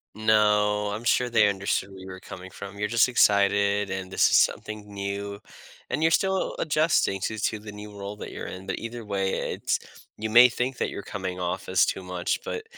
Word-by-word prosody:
No, 105 -1 +3
I'm 110 +3 -5
sure 125 +1 +2
they 115 -3 +4
understood 100 0 -1
where 95 - -11
you 95 - -10
were 95 0 -8
coming 95 -1 -10
from, 100 0 -9
you're 105 +1 -2
just 115 +3 +4
excited, 100 -3 +3
and 95 0 -5
this - - +4
is - - +3
something 105 -1 0
new, 100 0 -4 0.5
and - - -2
you're 160 0 +3
still 190 +3 +1
adjusting 155 - +1
to 110 - -2
to 110 +1 -1
the 105 0 -9
new 105 0 -10
role 100 +1 -6
that - - -7
you're - - -6
in, 95 +1 -8
but - - -2
either 115 0 -7
way, 95 -2 -1
it's - - -1 0.4
you 110 +1 -3
may 120 +3 +8
think 125 +2 -2
that - - 0
you're - - -6
coming 95 -2 -5
off 90 -1 -3
as - - +4
too 95 - -3
much, 90 -1 -2
but 450 - -4
105 Hz, 210 wpm, -26 LUFS, 100-110 Hz, 0.5 s, may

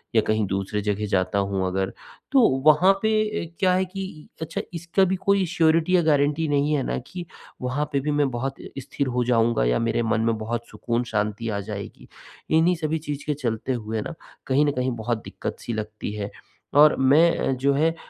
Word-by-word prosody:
या 110 - +6
कहीं 110 -1 +2
दूसरी 95 +2 -2
जगह 105 +1 -1
जाता 100 0 +1
हूँ 100 -1 -1
अगर 95 +1 -2 0.4
तो 275 - +5 0.3
वहाँ 175 +6 +6
पे 220 0 +2 0.3
अ, 170 - -23
क्या 185 -1 +3
है 185 +1 +2
कि 190 -4 -8
अच्छा 160 +1 -3
इसका 170 +3 +1
भी 190 +1 0
कोई 200 -1 +3
श्योरिटी 165 +1 +2
या 175 - +5
गारंटी 150 +1 +2
नहीं 145 +1 +1
है 140 -3 +1
ना - - -1
कि 180 -1 -7 0.4
वहाँ 125 +4 -1
पे 140 - +2
भी 150 +2 -2
मैं 145 -2 +3
बहुत 135 +3 -4
इ - - -9
स्थिर 140 +1 -3
हो 125 -1 0
जाऊँगा 115 - +2
या - - +2
मेरे 115 0 0
मन 110 0 +1
में 115 -1 +1
बहुत 115 +2 -4
सुकून 120 +1 -2
शांति 105 +2 -1
आ 100 -1 -2
जाएगी। 100 -1 -7 0.5
इन्हीं 175 +3 +4
सभी 160 -1 -1
चीज़ 145 -1 -4
के 150 - 0
चलते 130 -2 -2
हुए 110 -2 -3
ना, 170 - -6 0.3
कहीं 140 +3 +3
न 145 - +2
कहीं 130 -1 -1
बहुत 115 0 -3
दिक्कत-सी 120 - -6
लगती 105 -1 -5
है 100 -1 -4 0.4
और 150 +1 +7
मैं 150 +6 +5
अ, - - 0
जो 135 +2 +1
है 160 +3 +2
130 Hz, 205 wpm, -24 LUFS, 110-160 Hz, 0.5 s, और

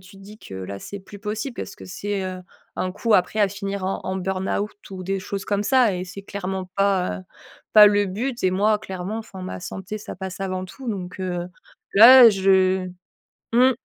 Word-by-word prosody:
te 195 +2 -16
dis 200 +2 -13
que 95 - -11
là 95 +1 -6
c'est 200 - -7
plus 200 +1 -13
possible 220 +5 -4
parce 200 - -7
que - - -11
c'est, 200 +1 -4
heu, 185 0 -5 0.3
un 185 - -2
coup 220 +4 +1
après 185 +4 +2
à 205 - +5
finir 200 0 -5
en 190 - -2
en 190 - -3
burnout 190 +2 -2 0.2
ou 185 -1 -7
des 195 +1 -2
choses 195 +1 -5
comme 205 0 0
ça 245 -4 +3
et 180 - -3
c'est 195 +2 -9
clairement 190 -1 -4
pas, 195 - +1
heu, - - -9 0.5
pas 210 -1 +10
le 205 0 +3
but 235 +7 -3
et 185 - +3
moi 210 +3 +2
clairement, 190 +1 -5
enfin 195 -4 -9
ma 185 - -6
santé, 190 +3 -6
ça 215 - -8
passe 190 0 -7
avant 185 -1 -3
tout 250 +7 -9
donc 190 -3 -5
heu, 175 -2 -3 0.5
là, 235 +3 +10
je 190 -1 +2 0.6
mmh. 250 +3 +5
195 Hz, 205 wpm, -23 LUFS, 185-210 Hz, 0.6 s, pas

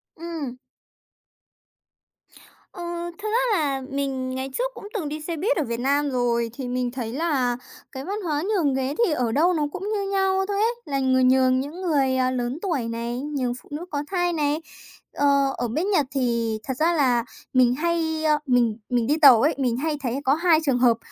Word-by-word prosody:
Ừm. 320 -7 -6 2.1
Ờ, 355 - -9 0.4
thực 420 +1 -5
ra 460 -1 +2
là 280 -4 0
mình 270 -2 -2
ngày 260 +1 -3
trước - - -1
cũng 410 - -9
từng 350 -10 -3
đi 305 +1 -5
xe 335 +2 -4
buýt 400 +10 +1
ở 315 - +1
Việt 235 -2 -3
Nam 285 +3 +1
rồi, 235 -2 0
thì 255 0 -6
mình 250 0 -1
thấy 240 -3 -5
là 265 -5 0 0.3
cái 265 +1 -7
văn 405 +4 -3
hóa 305 -4 -1
nhường 340 -10 +2
ghế 265 +1 -1
thì 355 - 0
ở 245 -5 0
đâu 330 +9 +3
nó 310 -3 0
cũng 385 +4 -5
như 400 -2 -2
nhau 385 -1 +2
thôi 405 -1 -2
ấy, 460 +2 +2
là 275 -1 -1
người 260 -1 +3
nhường 255 0 +4
những 295 +7 -5
người, 280 -7 +1
à, 255 0 +2
lớn 250 +1 -2
tuổi 315 - -1
này, 235 +2 -3
nhường 275 -4 -2
phụ - - -22
nữ 300 +4 -5
có 290 -1 -2
thai 355 -2 +1
này. 300 0 0 0.5
Ờ, 280 -1 +2
ở 245 - -1
bên 315 - -1
Nhật 365 -8 +3
thì 235 -4 0
thật 265 - -3
ra 330 +4 +2
là 255 -7 +2 0.3
mình 250 -1 +4
hay, 320 0 -1
ơ 305 -1 +3
mình 240 -5 +2
mình 240 -2 +1
đi 295 +3 +2
tàu 260 -6 +9
ấy, 300 +2 +2
mình 250 -4 0
hay 305 +2 -1
thấy 250 +1 -1
có 270 - +4
2 330 0 +4
trường 265 -4 +2
hợp, 240 -2 +4
280 Hz, 205 wpm, -24 LUFS, 255-330 Hz, 2.1 s, tàu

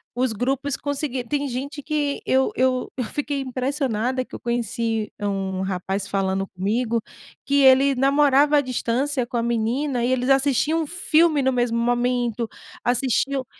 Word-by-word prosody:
Os 250 -2 0
grupos 270 +5 -1
conseguir 285 -3 -3
tem 285 -1 0
gente 275 +3 -5
que 295 -2 -1
eu 265 0 +2
eu 255 0 +1
eu 255 - -1
fiquei 285 +4 -3
impressionada 255 -2 -1
que - - -11
eu - - -7
conheci 230 -2 -2
um 195 -2 -2
rapaz 190 +1 -3
falando 195 -1 -1
comigo, 225 +6 -1 0.4
que 280 0 +3
ele 270 +1 +6
namorava 280 +2 +4
à - - +4
distância 255 +1 -1
com 240 - -4
a 230 - 0
menina 240 +3 0
e 245 - +1
eles 255 0 0
assistiam 275 +4 +2
um - - -7
filme 325 -2 +2
no 265 0 +1
mesmo 240 -2 0
momento, 240 -1 0 0.3
assistiam 260 +2 0
255 Hz, 155 wpm, -23 LUFS, 235-280 Hz, 0.4 s, ele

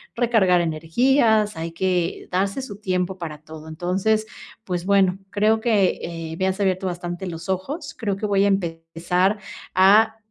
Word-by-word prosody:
recargar 225 -7 +3
energías, 210 - +2
hay 165 +1 -4
que 175 0 -1
darse 195 +7 0
su 200 -6 -8
tiempo 185 -2 -1
para 155 -3 -6
todo, 155 0 -11
entonces, 185 +7 0 0.4
pues 180 -3 -3
bueno, 195 -1 +3
creo 215 +2 +2
que, 215 -5 +2
eh, 165 -1 -6
me 190 - +1
has 190 +1 -2
abierto 190 -1 0
bastante 175 +1 -5
los 165 0 -7
ojos, 190 - -3
creo 210 -5 -1
que 210 - -3
voy 200 -1 +2
a - - +4
empezar 180 +1 0 0.4
a, 210 +4 +5
190 Hz, 155 wpm, -22 LUFS, 175-210 Hz, 0.4 s, a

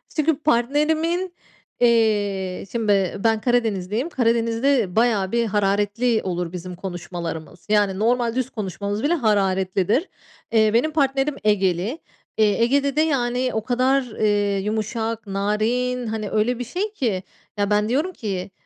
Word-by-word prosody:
çünkü 310 -1 +2
partnerimin 315 +7 +1 0.5
eee, 205 -6 +1
şimdi 200 -5 0
ben 225 -1 +2
Karadenizliyim. 225 - 0
Karadeniz'de 230 - +1
bayağı 220 -5 +2
bir 235 0 +1
hararetli 210 +3 +1
olur 175 -2 -3
bizim 180 0 -7
konuşmalarımız. 175 -2 -6
Yani, 205 -2 +2
normal 235 +1 +1
düz 260 -1 -1
konuşmamız 205 -1 -4
bile 300 +4 +2
hararetlidir. 200 - +1 0.4
Eee, 220 -1 +4
benim 250 +7 +2
partnerim 275 -1 +1
Egeli. 195 - +1 0.4
Eee, 215 0 +3
Ege'de 280 +3 +2
de, 305 - +3
yani, 255 -4 +1
o 220 - -1
kadar, 255 +3 +2 0.2
eee, 205 -2 +2
yumuşak, 220 +1 -3
narin, 225 +5 -1
hani, 215 -2 -3
öyle 230 +3 +1
bir - - -2
şey 380 - -3
ki. 215 - -1 0.3
Ya, 205 0 0
ben 210 +1 +2
diyorum 295 +9 0
ki 195 - -4
220 Hz, 130 wpm, -22 LUFS, 200-250 Hz, 0.5 s, Eee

